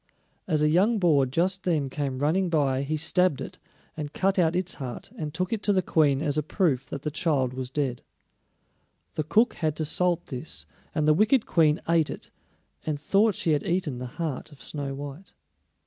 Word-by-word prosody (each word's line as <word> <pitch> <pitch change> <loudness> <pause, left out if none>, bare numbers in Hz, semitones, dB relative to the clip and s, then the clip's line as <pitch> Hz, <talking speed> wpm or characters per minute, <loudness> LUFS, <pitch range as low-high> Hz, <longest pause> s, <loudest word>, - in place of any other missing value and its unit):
As 155 -4 +2
a 150 - +4
young 200 +8 +3
boar 155 -8 +3
just 180 +8 +1
then 155 -6 +1
came 135 -1 -3
running 170 +7 +1
by 140 -5 +1
he 150 +3 -2
stabbed 180 0 +2
it, - - -7 0.4
and 150 -2 -5
cut 195 +1 +1
out 165 -1 +3
its 180 0 0
heart 125 -3 -6
and 155 -2 -4
took 185 +6 -2
it 220 - -2
to 205 - +2
the 185 -1 +2
Queen 145 -4 +2
as 150 -1 +1
a - - +1
proof 150 -4 0
that 140 - -6
the 150 - -2
child 145 -6 0
was 130 -1 -4
dead. 135 -3 -2 1.1
The 155 - -1
cook 220 +10 +3
had 155 -3 -1
to 155 - -2
salt 175 +2 +1
this, 135 +3 -5 0.3
and 155 -1 +1
the 155 - +6
wicked 220 - +3
Queen 155 -2 +3
ate 165 -2 +3
it, - - -8 0.5
and 150 -2 -2
thought 200 +6 +3
she 165 - 0
had 150 -2 +2
eaten 170 -8 -1
the 125 - -5
heart 160 -3 -3
of 145 - -15
Snow 140 -2 -4
white. 145 +6 -8
155 Hz, 200 wpm, -26 LUFS, 140-180 Hz, 1.1 s, the